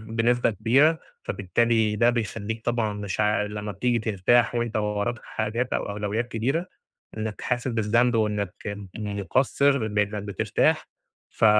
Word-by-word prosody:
بنسبة 120 +1 +3
كبيرة، 130 - +3 0.2
فبالتالي 110 +2 +1
ده 120 +3 +4
بيخلّيك 110 -1 -3
طبعًا 115 -3 0
مش 100 -1 -5
عا 105 0 +2
لما 105 0 -4
بتيجي 120 +4 0
ترتاح 115 +3 +2
وأنت 120 -2 -1
وراك 105 +2 -1
حاجات 115 +3 -2
أو - - -2
أولويّات 105 +3 -2
كبيرة 135 +11 -1 0.5
إنك 110 -1 -4
حاسس 125 +1 -1
بالذنب 120 +1 +2
وإنك 105 -4 0 0.4
مُقصِّر 110 +5 +1
بإنك 105 -1 -1
بترتاح، 100 -1 +1 0.4
ف - - +1
110 Hz, 130 wpm, -25 LUFS, 105-120 Hz, 0.5 s, ده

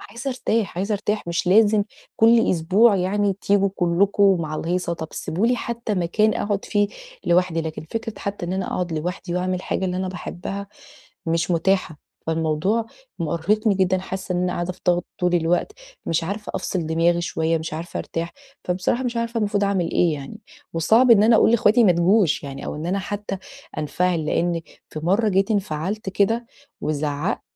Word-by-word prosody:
أ - - -12
عايزة 240 +5 -4
أرتاح، 230 -6 -1
عايزة 200 +3 -1
أرتاح. 210 0 -1
مش 170 +1 -1
لازم 210 +2 +5 0.3
كُلّ 230 +1 +5
أسبوع 195 +6 +4
يعني 195 +2 +1
تيجوا 200 0 +3
كُلّكم 190 +2 +3
مع 155 -1 -3
الهيصة. 175 +2 -1
طَب 160 -1 -5
سِيبوا 190 +8 -1
لي 245 +1 +2
حتى 235 -2 -3
مكان 205 +4 +2
أقعُد 205 -3 -1
فيه 205 -1 +1 0.4
لوحدي، 175 -1 +2
لكن 160 -1 -5
فكرة 225 -1 -4
حتى 200 -3 -4
إن 175 - -3
أنا 190 0 -2
أقعُد 180 -2 -2
لوحدي 175 +3 -3
وأعمل 185 +1 0
الحاجة 185 +1 -2
اللي 180 -1 -1
أنا 185 0 -2
باحبها 190 +2 -6 0.6
مش 165 +2 0
متاحة. 175 -2 +1 0.3
فالموضوع 160 +8 0 0.3
مأرهقني 195 +7 +1
جدًا 185 0 +2
حاسة 190 0 -5
إن 180 - 0
أنا 180 - 0
قاعدة 175 +1 -2
في - - -22
ضغط 175 0 +2
طُول 180 0 +1
الوقت، 175 - +1 0.3
مش 165 0 0
عارفة 205 +4 -5
أفصِل 175 -4 -2
دماغي 170 +2 +2
شوية، 165 -1 0
مش 160 0 -6
عارفة 165 +2 -5
أرتاح. 165 +1 -4 0.3
فبصراحة 185 +8 0
مش 240 -1 -2
عارفة 230 0 -1
المفروض 205 -1 +1
أعمل 190 -4 0
إيه 170 -3 +2
يعني، 145 +10 -8 0.3
وصعْب 225 +10 +4
إن 210 -3 +8
أنا 225 +1 +6
أقول - - +5
لإخواتي 230 +1 +4
ما 185 - +6
تجوش 175 0 +3
يعني 140 -1 -7
أو - - -4
إن 155 +3 -5
أنا 195 +3 0
حتى 200 0 -4 0.4
أنفعل، 160 +2 0
لإن 170 +1 0 0.3
في 155 - -6
مرّة 200 +7 +2
جيت 195 +1 +2
انفعلت 195 0 -2
كده 225 +5 +1 0.3
وزعقت 150 +3 -2
185 Hz, 180 wpm, -23 LUFS, 170-205 Hz, 0.6 s, إن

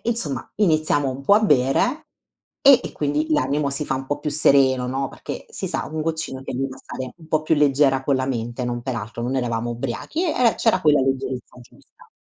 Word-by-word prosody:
insomma 225 - -2
iniziamo 155 -7 +2
un 130 +1 -7
po' 200 +9 +5
a 215 - +5
bere 150 - +2 0.5
e 275 -2 +8
e - - -7
quindi 150 +1 -1
l'animo 140 +1 +1
si 145 +2 -2
fa 135 - -1
un 135 0 -6
po' 145 +1 -3
più 150 - -2
sereno, 135 -3 +3
no, 135 +2 -2
perché - - -8
si - - -5
sa, - - -2
un 160 - -2
goccino 160 -4 -3
ti - - -5
aiuta 130 +1 -3
a - - -14
stare 130 -1 -7
un 160 -2 -16
po' 155 0 +1
più 155 0 +1
leggera 135 -2 +3
con 140 - +2
la 130 0 0
mente, 120 -1 -3
non 120 0 -3
peraltro, 115 -3 -5
non 125 +3 -2
eravamo 120 -2 -1
ubriachi, 120 - -3
eh, 250 -7 +2
eh, 225 - +4
c'era 220 -5 +2
quella 150 -4 +4
leggerezza 130 -2 -3
giusta. 120 - -20
135 Hz, 215 wpm, -22 LUFS, 130-155 Hz, 0.5 s, e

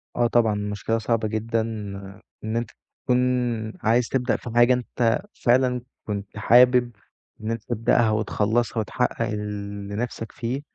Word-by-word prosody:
آه 120 0 +3
طبعًا، 115 -2 +3
المشكلة 105 +1 -2
صعبة 115 0 0
جدًا 110 +1 -1 0.8
إن 110 +1 -2
أنت 120 - -2 0.3
تكون 125 -2 +2 0.6
عايز 115 +2 +2
تبدأ 125 -2 +1
في - - -8
حاجة 120 +1 +6
أنت 120 -1 0 0.2
فعلًا 125 0 +3 0.3
كنت 100 0 -5
حابب 125 +3 +5 0.5
إن 110 +1 -2
أنت 115 -1 -4
تبدأها 115 -1 +2
وتخلّصها 110 +2 0
وتحقّق 110 - -1
اللي 100 -1 -5
نِفْسك 115 -1 -4
فيه، 125 +4 -3
115 Hz, 135 wpm, -24 LUFS, 105-120 Hz, 0.8 s, حاجة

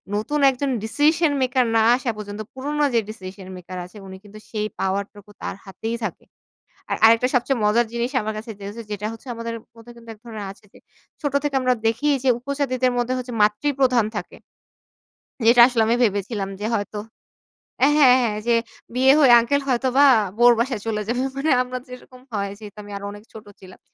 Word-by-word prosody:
নতুন 290 +8 -1
একজন 270 +2 -2
decision 300 +8 +2
maker 255 -1 +2
না 225 - +5
আসা 245 -1 -2
পর্যন্ত, 205 0 -7
পুরোনো 295 +3 -2
যে 235 - +4
ডিসিশন 190 -2 -9
মেকার 180 +1 -9
আছে, 180 +4 -15
উনি 190 0 -9
কিন্তু 210 +1 -13
সেই 215 -1 -2
পাওয়ারটুকু 200 +1 -3
তার - - -4
হাতেই 220 +4 -5
থাকে। 200 -6 -5 0.6
আর - - 0
আরেকটা 230 +2 +5
সবচেয়ে 250 +1 +1
মজার 230 +3 +3
জিনিস 235 +2 -2
আমার 215 +1 -3
কাছে 225 +2 -7
যে - - -10
হচ্ছে 230 +3 -8
যেটা 210 0 -3
হচ্ছে, 225 +4 -14
আমাদের 230 0 -5 0.2
মধ্যে 230 +1 -14
কিন্তু 230 -1 -15
এক 215 - -20
ধরনের 220 -3 -7
আছে 200 - -18
যে, - - -16 0.4
ছোটো 285 -1 0
থেকে 290 -2 -1
আমরা 255 0 +3
দেখি 230 +6 0 0.2
যে 265 - +3
উপজাতিদের 255 -1 -1
মধ্যে 245 +1 0
হচ্ছে 250 -1 -6
মাতৃপ্রধান 250 +2 +2
থাকে। - - -7 1.1
যেটা 235 +1 +7
আসলে 245 -3 0
আমি 230 - +3
ভেবেছিলাম 200 -1 -1
যে 215 - -1
হয়তো 205 0 -4 0.8
হ্যাঁ, 290 +2 +5
হ্যাঁ। 250 -4 +5
যে 240 - +3 0.4
বিয়ে 260 +2 +5
হয়ে 275 -5 +6
আঙ্কেল 280 +5 0
হয়তো 255 0 +1
বা 285 - +8 0.3
বউর 240 0 +7
বাসায় 240 -2 -1
চলে 215 -2 -1
যাবে। 245 +2 -1 0.2
মানে 290 +3 0
আমরা 255 0 -5
যেরকম 250 0 -12
হয়। 200 -2 -2
যেহেতু, 210 -1 -11
আমি 205 - -12
আরো 200 - -7
অনেক 205 +1 -12
ছোট 220 -1 -11 0.2
ছিলাম। 185 -1 -14
235 Hz, 190 wpm, -22 LUFS, 210-255 Hz, 1.1 s, বা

